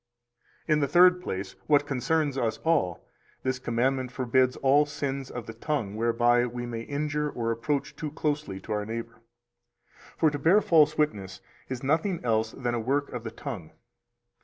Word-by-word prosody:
263 155 Hz, -, +2 dB
In 150 Hz, -, +3 dB
the 140 Hz, -, +1 dB
third 180 Hz, +3 st, +5 dB
place, 95 Hz, -, -4 dB
what 145 Hz, -1 st, +4 dB
concerns 145 Hz, +1 st, 0 dB
us 115 Hz, -4 st, -1 dB
all, 150 Hz, -, +1 dB, 0.4 s
this 130 Hz, -1 st, -1 dB
commandment 125 Hz, +1 st, 0 dB
forbids 130 Hz, 0 st, +2 dB
all 140 Hz, +2 st, +4 dB
sins 140 Hz, -2 st, -4 dB
of 120 Hz, -2 st, -6 dB
the 115 Hz, -, -7 dB
tongue 115 Hz, -4 st, -2 dB
whereby 120 Hz, +2 st, +3 dB
we 120 Hz, 0 st, -5 dB
may 115 Hz, -1 st, -4 dB
injure 150 Hz, +3 st, -2 dB
or 115 Hz, -4 st, -2 dB
approach 140 Hz, +5 st, -2 dB
too 155 Hz, -, -4 dB
closely 150 Hz, -9 st, -2 dB
to 105 Hz, -, -10 dB
our 105 Hz, -1 st, 0 dB
neighbor. 115 Hz, +2 st, -6 dB, 1.0 s
For 160 Hz, -2 st, +3 dB
to 145 Hz, -, -4 dB
bear 170 Hz, +8 st, +5 dB
false 155 Hz, -5 st, +4 dB
witness 100 Hz, -11 st, -1 dB, 0.3 s
is 130 Hz, -1 st, -5 dB
nothing 165 Hz, +6 st, +1 dB
else 110 Hz, -1 st, +1 dB
than 125 Hz, -2 st, -2 dB
a 120 Hz, -, 0 dB
work 140 Hz, +5 st, 0 dB
of 125 Hz, -2 st, -6 dB
the 115 Hz, -, -4 dB
tongue. 100 Hz, -7 st, -7 dB
130 Hz, 175 wpm, -27 LUFS, 115-150 Hz, 1.0 s, third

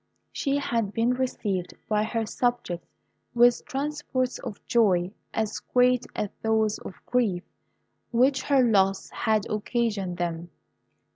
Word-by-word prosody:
She 280 Hz, 0 st, 0 dB
had 230 Hz, -7 st, -1 dB
been 230 Hz, +2 st, +2 dB
received 210 Hz, -8 st, -2 dB
by 210 Hz, -1 st, +2 dB
her 225 Hz, 0 st, -1 dB
subjects 240 Hz, -7 st, -1 dB, 0.5 s
with 240 Hz, 0 st, +5 dB
transports 270 Hz, -2 st, -2 dB
of 225 Hz, -6 st, -7 dB
joy 190 Hz, -6 st, +3 dB, 0.2 s
as 220 Hz, -1 st, -2 dB
great 250 Hz, 0 st, +2 dB
as 210 Hz, -, -1 dB
those 220 Hz, -1 st, +1 dB
of -, -, -9 dB
grief 215 Hz, -8 st, +1 dB, 0.7 s
which 260 Hz, +3 st, +3 dB
her 275 Hz, -2 st, +4 dB
loss 195 Hz, -4 st, +2 dB
had 215 Hz, -3 st, +1 dB
occasioned 210 Hz, -4 st, -1 dB
them. 170 Hz, -1 st, -3 dB
225 Hz, 125 wpm, -26 LUFS, 195-250 Hz, 0.7 s, with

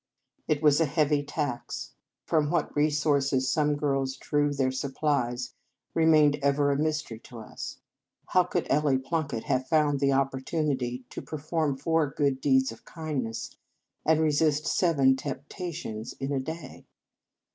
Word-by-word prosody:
It 150 Hz, 0 st, 0 dB
was 150 Hz, +1 st, +5 dB
a -, -, +5 dB
heavy 150 Hz, -1 st, +2 dB
tax. 145 Hz, -3 st, -4 dB, 0.3 s
From 155 Hz, -3 st, +2 dB
what 170 Hz, -2 st, -1 dB
resources 145 Hz, -3 st, +2 dB
some 150 Hz, 0 st, +2 dB
girls 135 Hz, -2 st, -1 dB
drew 145 Hz, -1 st, +1 dB
their 135 Hz, -2 st, +1 dB
sup 135 Hz, +1 st, -4 dB
plies 125 Hz, -5 st, 0 dB, 0.4 s
remained 155 Hz, -3 st, +4 dB
ever 140 Hz, +1 st, +2 dB
a -, -, +1 dB
mystery 150 Hz, -6 st, -1 dB
to 120 Hz, -, -12 dB
us. 110 Hz, -, -7 dB, 0.5 s
How -, -, +5 dB
could -, -, -1 dB
Ellie 145 Hz, -2 st, +3 dB
Plunkett 140 Hz, -3 st, -2 dB
have 130 Hz, 0 st, 0 dB
found 150 Hz, -3 st, +2 dB
the 140 Hz, 0 st, +3 dB
opportunity 135 Hz, -1 st, -1 dB
to -, -, -6 dB
perform 155 Hz, -2 st, -2 dB
four 160 Hz, +2 st, +1 dB
deeds 130 Hz, -2 st, +2 dB
of 115 Hz, -, -13 dB
kindness, 140 Hz, -9 st, -4 dB, 0.5 s
and 160 Hz, 0 st, +3 dB
resist 155 Hz, -1 st, +2 dB
seven 140 Hz, -8 st, +3 dB
tempta 145 Hz, +7 st, -5 dB
tions, 110 Hz, -9 st, -6 dB
in 135 Hz, +1 st, -4 dB
a 140 Hz, -, +1 dB
day? 160 Hz, +1 st, -7 dB
145 Hz, 145 wpm, -28 LUFS, 130-155 Hz, 0.5 s, was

